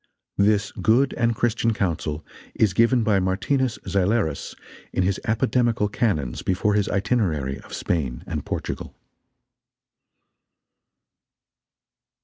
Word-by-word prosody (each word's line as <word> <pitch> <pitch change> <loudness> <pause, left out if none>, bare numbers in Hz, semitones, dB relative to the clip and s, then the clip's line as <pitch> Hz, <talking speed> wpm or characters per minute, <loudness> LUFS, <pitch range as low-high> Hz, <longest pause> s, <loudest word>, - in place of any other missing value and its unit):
(This 105 +1 +3
good 130 +5 +2
and 115 -1 +1
Christian 115 -1 +1
Counsel 80 -5 -2 0.3
is 105 -4 +2
given 115 +4 +3
by 105 -3 +3
Martinus 115 +7 0
Zeilerus 100 -5 0 0.4
in 95 - 0
his 95 +1 0
Apodemical 115 0 +1
Canons 85 - -1
before 95 +3 +1
his 105 0 +1
Itinerary 90 - 0
of - - -16
Spain 70 -8 -2
and - - -4
Portugal.) - - -5
105 Hz, 105 wpm, -24 LUFS, 90-115 Hz, 0.4 s, This